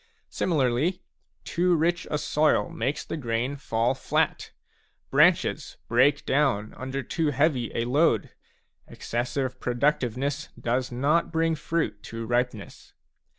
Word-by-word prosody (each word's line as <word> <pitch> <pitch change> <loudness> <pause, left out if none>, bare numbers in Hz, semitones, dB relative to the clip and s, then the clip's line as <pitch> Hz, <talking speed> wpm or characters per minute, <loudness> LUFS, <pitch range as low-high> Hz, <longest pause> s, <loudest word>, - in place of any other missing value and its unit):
Similarly, 155 +3 0 0.4
too 175 +1 +1
rich 170 +2 0
a 150 - 0
soil 150 +1 +2
makes 135 +6 -2
the - - -4
grain 120 0 -2
fall 120 -2 0
flat, 130 - -1 0.6
branches - - +3
break 135 +5 +3
down 130 -7 +1
under 130 +1 -5
too 160 +5 -1
heavy 140 -4 +1
a 115 - 0
load, 125 -4 +2 0.6
excessive 130 +2 -3
productiveness 135 +2 -1
does 125 +2 -1
not 145 +8 +1
bring 165 0 +1
fruit 160 -7 -2
to 115 0 -5
ripeness. 120 -2 -3
135 Hz, 115 wpm, -26 LUFS, 120-150 Hz, 0.6 s, branches